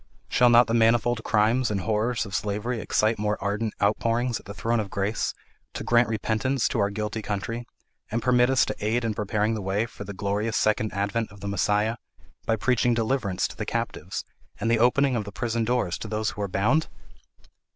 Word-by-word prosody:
Shall 125 -1 +5
not 120 +1 +7
the 115 - -2
manifold 115 0 +3
crimes 115 +4 +2
and 100 -2 -1
horrors 110 +3 0
of 100 - -9
slavery 105 +4 -2
excite 110 +1 +1
more 105 0 0
ardent 105 +2 -2
outpourings 115 +4 +1
at - - -17
the 100 - -6
throne 115 +4 0
of 105 -3 -3
grace 100 +3 -1 0.4
to - - -4
grant 120 0 +4
repentance 115 +4 0
to 120 - -1
our 100 -1 +2
guilty 105 +1 -3
country, 115 +3 -4 0.4
and 115 - -1
permit 125 +1 +3
us 135 -1 +4
to 105 - -3
aid 115 +3 +1
in 110 - 0
preparing 105 +1 0
the 110 - -3
way 100 +3 0
for 115 - -9
the 100 0 -7
glorious 105 +3 -1
second 110 0 +1
advent 100 +3 -1
of 100 -1 -14
the 100 - -5
Messiah, 105 +3 +1 0.5
by 115 - +3
preaching 120 +1 +2
deliverance 115 -5 0
to - - -10
the - - -4
captives, - - -3 0.3
and 115 - 0
the 115 - +3
opening 130 +3 +3
of 110 - -1
the 100 - -8
prison 115 +1 -1
doors 115 -7 0
to - - -6
those 110 0 -1
who 105 - -7
are 100 - 0
bound?" 120 +12 +1
110 Hz, 205 wpm, -26 LUFS, 105-120 Hz, 0.5 s, not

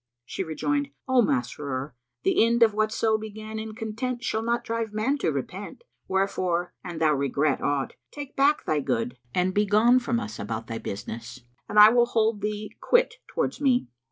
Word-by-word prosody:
She 190 - -3
rejoined, 285 - -1 0.2
"O 260 -1 +5
Masrur, 135 - -2 0.3
the - - +4
end 235 +1 +4
of 220 -2 +4
whatso 215 +1 +1
began 215 0 -7
in 220 0 -6
content 240 +3 -4
shall 220 -2 -1
not 235 +1 0
drive 230 -1 -2
man 245 +7 0
to - - +1
repent; - - -6 0.2
wherefore, 185 -2 0
an 175 -2 -6
thou 160 -1 +3
regret 140 +1 +1
aught, 140 -2 -1 0.2
take 290 -1 -8
back 285 +2 +3
thy 155 - +1
good 125 -2 -2 0.2
and 185 +1 +1
begone 210 +5 +4
from 235 -1 -1
us 110 - -6
about 110 +2 -4
thy 115 -1 -5
business 115 +5 -7 0.3
and - - -2
I 210 +1 +11
will 240 +1 +4
hold 225 -3 +1
thee 210 0 -4
quit 485 +1 +3
towards 485 - -2
me." 250 - +2
215 Hz, 175 wpm, -26 LUFS, 150-235 Hz, 0.3 s, I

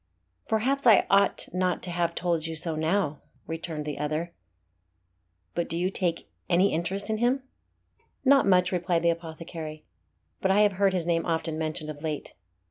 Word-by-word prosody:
"Perhaps 255 +5 +1
I 220 -4 +7
ought 200 0 +3
not 185 -1 0
to 180 - -1
have 170 -1 -1
told 170 -2 0
you 165 - -4
so 165 0 0
now," 160 -1 0 0.2
returned 160 -2 -5
the 150 -2 -4
other. 155 +3 -2 1.2
"But 170 - -2
do 165 - -1
you 180 +2 0
take 175 -4 -1 0.2
any 185 +3 +3
interest 190 +6 -1
in 215 - -1
him?" 255 +3 +1 0.8
"Not 275 -4 +5
much," 180 -1 +4
replied 175 -2 0
the 170 - +5
apothecary; 160 -1 -7 0.6
"but 190 - +1
I 195 +2 +5
have 210 -1 +5
heard 195 -1 +4
his 175 -3 0
name 170 0 0
often 160 -1 -1
mentioned 155 -1 -3
of 145 -1 -11
late. 155 -2 -4
170 Hz, 170 wpm, -27 LUFS, 160-190 Hz, 1.2 s, I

